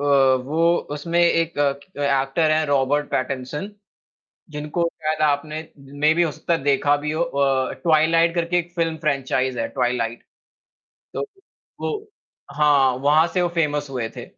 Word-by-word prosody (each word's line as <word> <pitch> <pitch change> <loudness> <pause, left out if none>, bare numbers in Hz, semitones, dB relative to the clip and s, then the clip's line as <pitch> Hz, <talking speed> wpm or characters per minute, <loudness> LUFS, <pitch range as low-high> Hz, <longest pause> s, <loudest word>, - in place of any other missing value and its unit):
अ, - - -3
वो 140 +4 +3 0.2
उसमें 170 +3 -2
एक 165 -2 +2
अ, 140 -1 +2 0.3
एक्टर 140 +3 +1
है 155 0 +2
रॉबर्ट 145 +1 +1
पैटर्नसन, 130 +8 -3 0.8
जिनको 150 +3 -2
शायद 155 0 -1
आपने 150 +1 0 0.5
मेबी 160 +2 +4
हो 165 - +1
सकता 155 +3 -1
है 165 - -3
देखा 145 +1 +2
भी 150 - -1
हो 160 - 0
अ, 140 -5 0
"ट्वाइलाइट" 165 +1 +3
करके 170 +1 +1
एक 175 0 -4
फ़िल्म 165 -1 0
फ्रेंचाइज़ 130 -4 -1
है - - -1
ट्वाइलाइट। 120 -3 -2 0.9
तो - - -3 0.6
वो - - -1 0.6
हाँ, 145 -3 +4
वहाँ 145 +4 +3
से 180 - +1
वो 175 - +1
फ़ेमस 145 -2 0
हुए 125 -4 -3
थे। - - -7
150 Hz, 150 wpm, -22 LUFS, 135-165 Hz, 0.9 s, मेबी